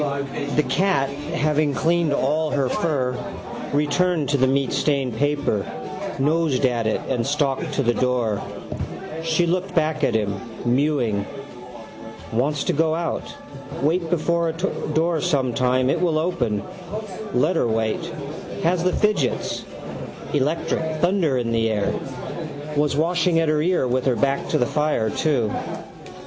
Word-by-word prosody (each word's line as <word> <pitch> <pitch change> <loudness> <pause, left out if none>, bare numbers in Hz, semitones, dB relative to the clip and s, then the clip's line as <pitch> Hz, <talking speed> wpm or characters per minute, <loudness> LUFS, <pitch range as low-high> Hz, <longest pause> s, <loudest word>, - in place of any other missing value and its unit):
The 150 - +3
cat, 180 -8 +2
having 150 0 0
cleaned 170 0 +2
all 150 +3 +1
her 140 -3 +1
fur, 130 -7 0 0.6
returned 150 +2 +1
to 145 - +3
the 130 0 +4
meatstained 135 -1 +1
paper, 145 -6 +1 0.5
nosed 145 -1 +2
at 120 -3 +1
it 110 - 0
and 125 -3 0
stalked 145 +2 0
to 140 - +1
the 120 0 +3
door. 120 -5 +1 0.8
She 165 +1 +2
looked 180 +2 -1
back 155 -2 +1
at 120 -4 +2
him, 100 -3 0 0.3
mewing. 120 -5 +1 1.1
Wants 140 +5 +1
to - - 0
go 160 +1 +2
out. 170 0 -3 0.5
Wait 165 +3 +1
before 170 0 +1
a - - -2
door 165 -2 0
sometime 130 -5 +2
it 165 +5 +1
will 165 -3 +2
open. 130 - 0 0.7
Let 185 - +3
her 125 - +2
wait. 110 -1 0 0.6
Has 170 +1 +2
the 185 - +2
fidgets. 210 - 0 0.7
Electric. 155 +2 0
Thunder 175 -5 +2
in 120 -2 -1
the 115 -1 +2
air. 105 -2 0 0.8
Was 145 -1 +2
washing 170 +1 +2
at 165 -1 +2
her 155 -1 +2
ear 175 -5 +2
with 125 +1 0
her 130 - +3
back 140 +3 0
to - - +2
the 125 - +2
fire 150 -7 +1
too. 125 -9 +1
145 Hz, 140 wpm, -23 LUFS, 125-165 Hz, 1.1 s, the